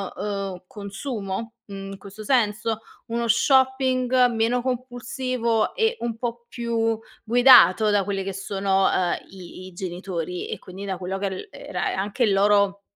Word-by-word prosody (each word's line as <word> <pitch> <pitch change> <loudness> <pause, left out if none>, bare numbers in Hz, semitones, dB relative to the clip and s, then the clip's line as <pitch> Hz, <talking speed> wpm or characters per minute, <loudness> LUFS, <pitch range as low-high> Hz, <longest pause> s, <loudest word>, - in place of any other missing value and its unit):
uhm, 195 -3 -4
consumo, 205 +1 -5
mhmm, 195 -1 -8
questo 200 +2 -11
senso, 225 -2 +1 0.3
uno 235 0 -1
shopping 255 +1 +3
meno 230 +2 +1
compulsivo 250 -2 -1
e 450 +2 +1
un 230 -1 -3
po' 235 0 -4
più 230 -2 -1 0.2
guidato 235 -3 +7
da 205 -1 +3
quelle 195 -1 -2
che 195 - -4
sono, 195 0 0
uhm, 175 -2 +2 0.2
i 185 -1 -10
i 185 - -13
genitori 180 -1 -4
e - - -4
quindi 190 +2 -9
da 190 -2 -3
quello 190 +2 -4
che 200 - -3
el 190 -1 -4
era - - -5
anche 205 +6 -1
il 205 -3 +3
loro 200 0 +3
210 Hz, 150 wpm, -24 LUFS, 195-240 Hz, 0.3 s, guidato